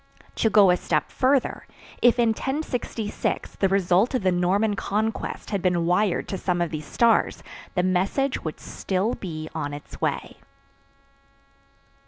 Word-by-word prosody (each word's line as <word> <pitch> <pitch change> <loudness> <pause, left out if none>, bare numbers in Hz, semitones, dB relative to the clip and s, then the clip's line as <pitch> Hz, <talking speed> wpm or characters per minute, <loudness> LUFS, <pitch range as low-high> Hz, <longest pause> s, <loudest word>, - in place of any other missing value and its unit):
To 225 - +3
go 200 -3 +6
a 180 - +3
step 155 -4 -1
further, 265 0 +1 0.3
if 245 0 +5
in 235 -1 +3
1066 245 -3 -3
the 195 - +3
result 195 +5 +2
of 250 - -1
the 185 - +3
Norman 195 +4 +1
Conquest 215 +3 -3
had 200 -3 -1
been 175 -2 +1
wired 180 +2 +1
to 190 - -3
some 180 -2 0
of 170 -2 -1
these 155 -2 -5
stars, 230 -1 +2 0.3
the 180 - +2
message 190 +9 0
would 155 - -5
still 195 +5 -2
be 155 -4 -6
on 145 -3 -3
its 145 - -11
way. - - -2
195 Hz, 150 wpm, -24 LUFS, 175-225 Hz, 0.3 s, go